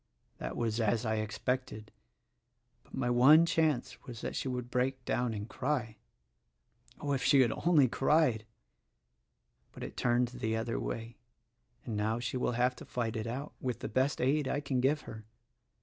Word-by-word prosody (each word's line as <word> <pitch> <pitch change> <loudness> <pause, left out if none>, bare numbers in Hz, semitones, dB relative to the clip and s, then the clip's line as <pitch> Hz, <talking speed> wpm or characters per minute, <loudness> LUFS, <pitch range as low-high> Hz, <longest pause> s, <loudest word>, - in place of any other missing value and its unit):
That - - -5
was 115 -1 -1
as 115 +2 +1
I 110 0 0
expected; 110 0 -3 0.9
but - - -12
my 120 - 0
one 145 +7 +7
chance 155 -6 0
was 120 -3 -8
that - - -4
she - - -2
would 125 -1 -4
break 130 0 -1
down 120 -1 0
and 105 +1 -5
cry. 125 -4 -2 1.0
Oh, 145 - -3
if 135 - 0
she 135 +2 +6
had 120 - +3 0.2
only 150 -7 +6
cried! 130 -4 +2 1.2
but - - -9
it - - -7
turned 120 0 +2
the 110 -3 -2
other 115 +1 -2
way; 115 +1 -5 0.7
and 115 - -4
now 110 +2 0
she 120 +1 -3
will 125 -1 0
have 125 +2 +1
to - - -9
fight 115 -2 -3
it 110 0 -3
out, 135 +6 -5
with 125 -3 -3
the - - -3
best 130 +3 +1
aid 140 +2 +2
I - - 0
can 140 -3 -1
give 145 +3 +2
her. 110 -1 -9
125 Hz, 175 wpm, -32 LUFS, 115-135 Hz, 1.2 s, one